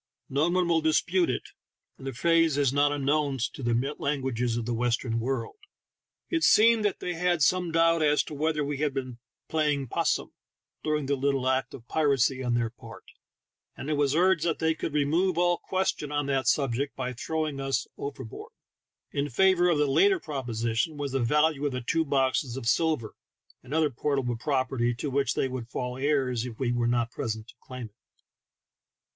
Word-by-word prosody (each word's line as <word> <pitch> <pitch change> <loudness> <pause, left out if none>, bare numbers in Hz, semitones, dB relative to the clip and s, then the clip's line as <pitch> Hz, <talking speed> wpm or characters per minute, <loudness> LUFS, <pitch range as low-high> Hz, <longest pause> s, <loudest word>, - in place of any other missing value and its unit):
No 145 +5 +1
one 180 0 +1
will 165 -1 +2
dispute 170 +2 +2
it, - - -3 0.5
and 135 - -8
the 135 - -3
phrase 165 +2 +3
is 140 -3 +2
not 145 +1 +3
unknown 145 0 0 0.2
to - - -9
the 120 +4 0
languages 130 -5 -1
of 120 - -3
the 120 - -2
Western 115 0 0
world. 125 - -3 0.7
It 330 -2 -1
seemed 225 0 +5
that 205 -2 -1
they 180 - -2
had 175 -2 +1
some 180 +2 +2
doubt 165 0 +3
as 150 -1 +3
to - - -9
whether 150 0 0
we 145 0 -3
had 145 -1 -1
been 130 -3 -4 0.3
"playing 150 -4 0
'possum" - - 0 0.5
during 150 -2 0
the 140 +1 +1
little 135 -1 0
act 130 0 0
of 120 -1 -13
piracy 135 -4 +2
on 120 -1 0
their 115 -2 0
part, - - -12 0.7
and 145 - -4
it - - +2
was 145 -1 +1
urged 180 -1 +3
that 165 -2 0
the^^ 160 -1 +1
could 155 -1 -4
remove 165 +5 +1
all 175 0 +2
question 185 -6 -2
on 145 -1 0
that 135 -3 0
subject 135 0 +1
by 125 -1 -3
throwing 155 +3 -3
us 135 -2 -1
over 140 -2 -6
board. 110 - -10 0.6
In 145 +1 -1
favor 180 +5 +4
of 170 - +2
the 150 - +3
latter 380 - +4
proposition 120 - -2
was 145 -2 -3
the 135 - 0
value 150 +4 +2
of 140 - -3
the 125 - -3
two 165 +4 +1
boxes 135 -2 0
of 115 - -5
silver 155 -6 +1 0.5
and 130 - -14
other 155 -1 +2
port' 140 +3 -1
able 125 -3 -1
property 130 -1 0
to 140 +4 -4
which 140 0 0
they - - +1
would 125 -2 -6
fall 125 0 -4
heirs 130 -4 0
if 120 -3 -7
we 125 -3 0
were 120 -1 0
not 120 -1 0
present 110 -4 -4
to - - -14
claim 125 -2 -8
it. 105 -2 -14
140 Hz, 195 wpm, -27 LUFS, 125-155 Hz, 0.7 s, seemed